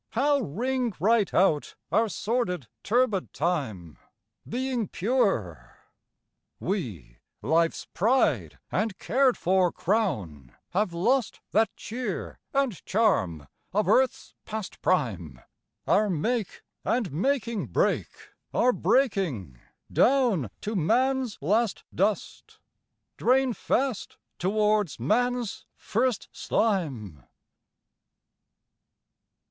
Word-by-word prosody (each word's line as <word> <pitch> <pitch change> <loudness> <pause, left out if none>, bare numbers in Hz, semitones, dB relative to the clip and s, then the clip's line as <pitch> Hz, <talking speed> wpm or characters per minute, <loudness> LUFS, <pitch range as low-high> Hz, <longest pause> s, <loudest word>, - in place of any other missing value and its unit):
How 280 +4 +3
ring 245 - -1
right 215 +3 +3
out 170 -6 +2 0.2
our 225 0 +3
sordid 200 - -1 0.2
turbid 220 -4 +1
time, 130 - -2 0.5
Being 250 -2 -1
pure! 190 - -1 0.8
We, 110 - -4 0.2
life's 165 +1 +1
pride 240 +8 +2
and 215 -3 -1
cared 260 +1 +2
for 185 -1 +2
crown, 105 - -2 0.2
Have 195 +1 +1
lost 235 +9 +1
that 220 0 +3
cheer 245 +3 -5
and 275 - 0
charm 100 - +1 0.3
of 210 +2 +1
earth's 260 0 +2
past 215 -3 -6
prime: 90 - 0 0.5
Our 210 +1 +3
make 210 +5 -1 0.2
and 230 -7 0
making 230 - -1
break, - - +1 0.5
are 250 +1 +4
breaking, 170 - 0 0.3
down 240 - +3
To 215 +2 -3
man's 250 - +1
last 210 +7 +1
dust, 200 +2 -2 0.6
drain 260 0 +3
fast 255 +2 -1 0.2
towards 210 - +1
man's 245 - 0
first 240 +1 -1
slime. 135 - -1
210 Hz, 90 wpm, -27 LUFS, 165-245 Hz, 0.8 s, are